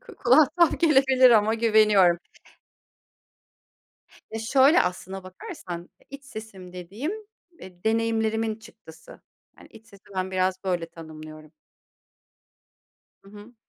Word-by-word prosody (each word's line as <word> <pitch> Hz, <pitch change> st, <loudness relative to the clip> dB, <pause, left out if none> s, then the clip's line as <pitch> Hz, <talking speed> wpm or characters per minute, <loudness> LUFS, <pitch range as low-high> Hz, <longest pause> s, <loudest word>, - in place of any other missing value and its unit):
ku 440 Hz, -, -12 dB
kulağa 265 Hz, +5 st, +6 dB
tuhaf 340 Hz, 0 st, +3 dB
gelebilir 265 Hz, -5 st, +5 dB
ama 220 Hz, 0 st, +4 dB
güveniyorum. 210 Hz, -6 st, +4 dB, 2.1 s
Ya, 225 Hz, -, -5 dB
şöyle, 265 Hz, +7 st, +4 dB
aslına 185 Hz, +1 st, -5 dB
bakarsan, 185 Hz, -, -9 dB
eee, -, -, -27 dB
iç 280 Hz, 0 st, -11 dB
sesim 215 Hz, -7 st, -11 dB
dediğim, 200 Hz, -, -6 dB, 0.5 s
eee, 180 Hz, 0 st, -14 dB
deneyimlerimin 225 Hz, 0 st, 0 dB
çıktısı. 215 Hz, -8 st, -16 dB, 0.4 s
Hani, -, -, -17 dB
iç 225 Hz, 0 st, -17 dB
sesi 200 Hz, -2 st, -19 dB
ben 185 Hz, 0 st, -3 dB
biraz 185 Hz, 0 st, -1 dB
böyle 175 Hz, -3 st, -2 dB
tanımlıyorum. 155 Hz, -1 st, -12 dB, 1.7 s
Hı 195 Hz, -, -17 dB
hı. 210 Hz, +4 st, -14 dB
215 Hz, 115 wpm, -25 LUFS, 180-230 Hz, 2.1 s, kulağa